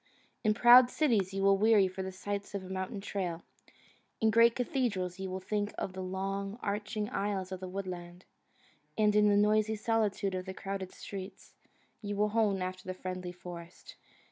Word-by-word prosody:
In 215 Hz, -2 st, +3 dB
proud 245 Hz, +2 st, +8 dB
cities 225 Hz, -, +1 dB
you 195 Hz, 0 st, -2 dB
will 195 Hz, 0 st, +5 dB
weary 215 Hz, -2 st, +5 dB
for 185 Hz, +1 st, -6 dB
the 190 Hz, 0 st, -4 dB
sight 200 Hz, +2 st, -5 dB
of 195 Hz, -, -3 dB
a 185 Hz, -, -10 dB
mountain 190 Hz, +1 st, -4 dB
trail; 180 Hz, -4 st, -3 dB, 0.8 s
in 220 Hz, 0 st, +3 dB
great 230 Hz, +1 st, +5 dB
cathedrals 215 Hz, -8 st, -1 dB
you 190 Hz, 0 st, -4 dB
will 185 Hz, +1 st, -4 dB
think 205 Hz, +2 st, -2 dB
of 185 Hz, -, -3 dB
the 190 Hz, -, -5 dB
long, 195 Hz, +2 st, -3 dB
arching 210 Hz, +1 st, -2 dB
aisles 195 Hz, -2 st, -2 dB
of 185 Hz, -, -4 dB
the 185 Hz, 0 st, -6 dB
woodland; 180 Hz, -2 st, -6 dB, 0.7 s
and 210 Hz, -1 st, +3 dB
in 210 Hz, 0 st, +5 dB
the 205 Hz, -, +4 dB
noisy 215 Hz, +1 st, +3 dB
solitude 215 Hz, -3 st, 0 dB
of 185 Hz, 0 st, -4 dB
crowded 195 Hz, -1 st, -5 dB
streets 190 Hz, -1 st, -9 dB, 0.5 s
you 205 Hz, -1 st, -4 dB
will 210 Hz, +1 st, +2 dB
hone 205 Hz, -4 st, +1 dB
after 185 Hz, 0 st, -6 dB
the 185 Hz, -, -3 dB
friendly 185 Hz, -1 st, -5 dB
forest. 175 Hz, -1 st, -10 dB
195 Hz, 175 wpm, -31 LUFS, 185-210 Hz, 0.8 s, proud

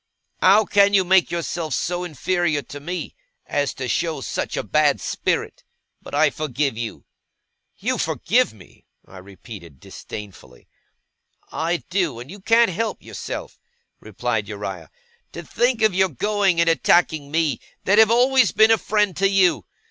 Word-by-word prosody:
How 205 Hz, +3 st, +5 dB
can 200 Hz, 0 st, +4 dB
you 190 Hz, -, +4 dB
make 190 Hz, 0 st, +4 dB
yourself 170 Hz, -1 st, -3 dB
so 175 Hz, +1 st, -2 dB
inferior 175 Hz, -1 st, -1 dB
to 145 Hz, +4 st, -10 dB
me, 175 Hz, +5 st, -5 dB, 0.3 s
as 145 Hz, -1 st, -1 dB
to 130 Hz, -, -5 dB
show 165 Hz, +3 st, -1 dB
such -, -, -4 dB
a -, -, -2 dB
bad -, -, +2 dB
spirit? -, -, -3 dB, 0.4 s
But -, -, -8 dB
I 150 Hz, 0 st, +3 dB
forgive 140 Hz, -3 st, -2 dB
you.' 115 Hz, -1 st, -6 dB, 0.7 s
'You -, -, -2 dB
forgive -, -, +1 dB
me!' -, -, -19 dB, 0.2 s
I 95 Hz, -, -12 dB
repeated 95 Hz, -, -12 dB
disdainfully. 95 Hz, -12 st, -11 dB, 0.8 s
'I 170 Hz, +2 st, -2 dB
do, 175 Hz, -10 st, -1 dB
and 125 Hz, +6 st, -10 dB
you 205 Hz, -, -10 dB
can't 230 Hz, +2 st, +3 dB
help 225 Hz, +6 st, -3 dB
yourself,' -, -, -7 dB, 0.4 s
replied -, -, -3 dB
Uriah. -, -, -7 dB, 0.4 s
'To -, -, -7 dB
think 240 Hz, -2 st, 0 dB
of 215 Hz, -3 st, +4 dB
your 190 Hz, +1 st, +2 dB
going 195 Hz, -, 0 dB
and 170 Hz, -, +3 dB
attacking 165 Hz, -3 st, +2 dB
me, 160 Hz, -1 st, 0 dB, 0.2 s
that 205 Hz, +3 st, +3 dB
have 220 Hz, -1 st, +7 dB
always 255 Hz, +2 st, +4 dB
been 220 Hz, +1 st, +5 dB
a 225 Hz, -, +4 dB
friend 210 Hz, -4 st, 0 dB
to 195 Hz, +1 st, +2 dB
you! 195 Hz, -2 st, +2 dB
175 Hz, 155 wpm, -22 LUFS, 145-200 Hz, 0.8 s, have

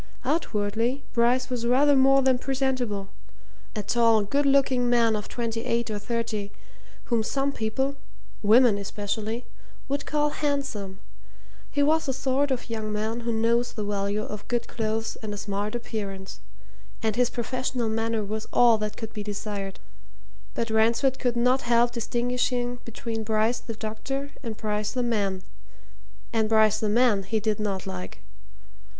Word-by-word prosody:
Outwardly, 240 Hz, -2 st, 0 dB
Bryce 245 Hz, +2 st, +2 dB
was 235 Hz, -2 st, -1 dB
rather 280 Hz, +4 st, +5 dB
more 270 Hz, 0 st, +5 dB
than 260 Hz, -1 st, +3 dB
presentable 255 Hz, -7 st, -1 dB, 0.7 s
a 210 Hz, -, -2 dB
tall, 230 Hz, 0 st, +4 dB
good 280 Hz, +7 st, +1 dB
looking 265 Hz, -3 st, +3 dB
man 230 Hz, -2 st, +4 dB
of 210 Hz, -1 st, -4 dB
twenty 230 Hz, -1 st, -3 dB
eight 235 Hz, -1 st, 0 dB
or 210 Hz, -, -2 dB
thirty, 215 Hz, -2 st, -2 dB, 0.5 s
whom 235 Hz, -2 st, +1 dB
some 275 Hz, +5 st, 0 dB
people 265 Hz, +4 st, -1 dB, 0.4 s
women 220 Hz, 0 st, +5 dB
especially 215 Hz, +3 st, -3 dB, 0.4 s
would 280 Hz, +1 st, -2 dB
call 295 Hz, 0 st, +2 dB
handsome; 275 Hz, -11 st, -2 dB, 0.7 s
he 285 Hz, -, +1 dB
was 315 Hz, +1 st, +3 dB
the 265 Hz, -, +1 dB
sort 270 Hz, +2 st, +1 dB
of 260 Hz, -2 st, -2 dB
young 220 Hz, -2 st, -3 dB
man 215 Hz, +2 st, -2 dB
who 235 Hz, 0 st, -2 dB
knows 230 Hz, +2 st, +1 dB
the 215 Hz, -, -3 dB
value 205 Hz, +1 st, -1 dB
of 210 Hz, -1 st, -7 dB
good 240 Hz, -1 st, -1 dB
clothes 220 Hz, 0 st, -2 dB
and 210 Hz, -2 st, -5 dB
a -, -, -7 dB
smart 205 Hz, +2 st, -3 dB
appearance, 200 Hz, -5 st, -5 dB, 0.6 s
and 220 Hz, -2 st, +1 dB
his 245 Hz, -1 st, +3 dB
professional 250 Hz, 0 st, -2 dB
manner 225 Hz, 0 st, 0 dB
was 215 Hz, +2 st, -4 dB
all 235 Hz, -2 st, +5 dB
that 210 Hz, 0 st, -3 dB
could 225 Hz, -1 st, -6 dB
be 210 Hz, -, -4 dB
desired. 205 Hz, -1 st, -4 dB, 0.8 s
But 230 Hz, -1 st, -1 dB
Ransford 230 Hz, +4 st, +3 dB
could 245 Hz, -2 st, 0 dB
not 250 Hz, +3 st, +3 dB
help 240 Hz, 0 st, +3 dB
distinguishing 245 Hz, +1 st, -1 dB
between 230 Hz, -1 st, -4 dB
Bryce 220 Hz, +2 st, +1 dB
the 225 Hz, -, -7 dB
doctor 270 Hz, +6 st, -4 dB
and 225 Hz, -4 st, -5 dB
Bryce 210 Hz, -1 st, -2 dB
the 250 Hz, -1 st, 0 dB
man 200 Hz, -5 st, 0 dB, 0.9 s
and 220 Hz, -1 st, +2 dB
Bryce 220 Hz, -1 st, +4 dB
the 215 Hz, -, 0 dB
man 230 Hz, -2 st, +4 dB
he 215 Hz, +3 st, -1 dB
did 215 Hz, -1 st, 0 dB
not 200 Hz, -3 st, -2 dB
like. 90 Hz, 0 st, -6 dB
230 Hz, 155 wpm, -26 LUFS, 215-250 Hz, 0.9 s, rather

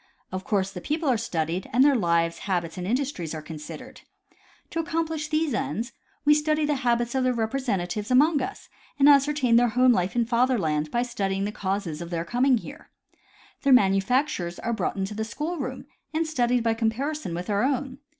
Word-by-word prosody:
Of 185 Hz, 0 st, -4 dB
course 195 Hz, -2 st, 0 dB
the 180 Hz, -, -7 dB
people 310 Hz, -, -2 dB
are 255 Hz, -, +4 dB
studied, 175 Hz, -5 st, -2 dB
and 255 Hz, +4 st, +5 dB
their 285 Hz, 0 st, +5 dB
lives, 170 Hz, -5 st, +1 dB
habits 170 Hz, -3 st, -1 dB
and 180 Hz, 0 st, -5 dB
industries 235 Hz, -, -2 dB
are 155 Hz, -, -5 dB
considered. 150 Hz, -2 st, -9 dB, 0.7 s
To 330 Hz, -, -2 dB
accomplish 320 Hz, -1 st, -2 dB
these 310 Hz, -2 st, 0 dB
ends 240 Hz, -2 st, -2 dB, 0.3 s
we 295 Hz, -, +7 dB
study 305 Hz, 0 st, +1 dB
the 295 Hz, -1 st, 0 dB
habits 240 Hz, -1 st, +1 dB
of 265 Hz, -1 st, +1 dB
their 255 Hz, -1 st, +1 dB
repre 230 Hz, +4 st, -1 dB
sentatives 205 Hz, -2 st, -2 dB
among 290 Hz, +4 st, +4 dB
us 390 Hz, -, -6 dB, 0.3 s
and 280 Hz, 0 st, +5 dB
ascertain 280 Hz, -4 st, +5 dB
their 245 Hz, 0 st, +5 dB
home 255 Hz, 0 st, +6 dB
life 180 Hz, 0 st, -1 dB
in 235 Hz, -1 st, +2 dB
fatherland 225 Hz, -11 st, +1 dB
by 240 Hz, +7 st, 0 dB
studying 195 Hz, -5 st, -2 dB
the 205 Hz, -, -2 dB
causes 190 Hz, -6 st, -3 dB
of 170 Hz, -, -6 dB
their 170 Hz, -1 st, -3 dB
coming 250 Hz, +5 st, +3 dB
here. 285 Hz, +7 st, -10 dB, 0.7 s
Their 275 Hz, -2 st, +4 dB
manufact 225 Hz, +6 st, +3 dB
ures 175 Hz, 0 st, -5 dB
are 235 Hz, -, -1 dB
brought 200 Hz, -5 st, -1 dB
into 195 Hz, +2 st, -2 dB
the 220 Hz, +1 st, -3 dB
school 305 Hz, +10 st, -4 dB
room 260 Hz, -2 st, -5 dB, 0.3 s
and 325 Hz, +1 st, +1 dB
studied 245 Hz, -6 st, +1 dB
by 230 Hz, -1 st, +2 dB
compari 230 Hz, +7 st, -1 dB
son 180 Hz, -, -5 dB
with 175 Hz, +1 st, -5 dB
our 205 Hz, -1 st, +1 dB
own. 270 Hz, 0 st, -1 dB
235 Hz, 200 wpm, -25 LUFS, 190-275 Hz, 0.7 s, we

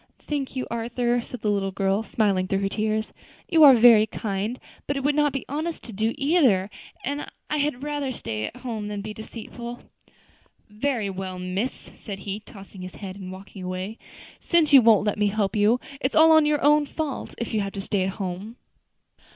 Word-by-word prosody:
"Thank 280 Hz, -3 st, -4 dB
you, 255 Hz, -, -2 dB
Arthur," 240 Hz, +1 st, 0 dB
said 240 Hz, 0 st, -9 dB
the 210 Hz, -, +1 dB
little 195 Hz, -1 st, 0 dB
girl, 195 Hz, +1 st, 0 dB
smiling 200 Hz, -4 st, +1 dB
through 195 Hz, +1 st, 0 dB
her 195 Hz, -, 0 dB
tears; 215 Hz, +1 st, -1 dB, 0.3 s
"you 325 Hz, -2 st, +5 dB
are 275 Hz, -3 st, +10 dB
very 225 Hz, -2 st, +7 dB
kind, 210 Hz, +4 st, -3 dB, 0.3 s
but 285 Hz, -, -1 dB
it 275 Hz, -, -3 dB
would 290 Hz, +1 st, +3 dB
not 295 Hz, 0 st, +2 dB
be 270 Hz, -, -4 dB
honest 315 Hz, +4 st, -3 dB
to 230 Hz, -, -9 dB
do 220 Hz, +3 st, 0 dB
either, 270 Hz, -, +3 dB, 0.3 s
and 285 Hz, +3 st, -3 dB, 0.2 s
I 300 Hz, -, +1 dB
had 285 Hz, -3 st, -1 dB
rather 290 Hz, -2 st, -2 dB
stay 110 Hz, -, -4 dB
at -, -, -7 dB
home 225 Hz, -5 st, -4 dB
than 205 Hz, -1 st, -4 dB
be 215 Hz, 0 st, -5 dB
deceitful." 235 Hz, +2 st, -8 dB, 0.9 s
"Very 220 Hz, -2 st, -1 dB
well, 185 Hz, -1 st, -5 dB
miss," 185 Hz, +7 st, -4 dB
said 200 Hz, -3 st, -7 dB
he, 200 Hz, +1 st, -4 dB
tossing 195 Hz, -2 st, -13 dB
his 185 Hz, 0 st, -8 dB
head, 190 Hz, -2 st, -7 dB
and 190 Hz, -2 st, -8 dB
walking 190 Hz, +1 st, -10 dB
away, 185 Hz, +4 st, -5 dB, 0.4 s
"since 330 Hz, -4 st, +2 dB
you 270 Hz, -, +10 dB
won't 220 Hz, -3 st, +5 dB
let 210 Hz, 0 st, -1 dB
me 210 Hz, -, +3 dB
help 205 Hz, 0 st, 0 dB
you, 215 Hz, +4 st, +4 dB, 0.2 s
it 260 Hz, -, 0 dB
is -, -, -9 dB
all 315 Hz, 0 st, +7 dB
your 295 Hz, -1 st, +1 dB
own 295 Hz, 0 st, +5 dB
fault 305 Hz, -3 st, -4 dB
if 235 Hz, -, -4 dB
you 215 Hz, -, +1 dB
have 195 Hz, 0 st, -4 dB
to 200 Hz, -, -5 dB
stay 200 Hz, 0 st, -1 dB
at 185 Hz, -, +1 dB
home." 195 Hz, +3 st, -5 dB
220 Hz, 200 wpm, -25 LUFS, 195-270 Hz, 0.9 s, are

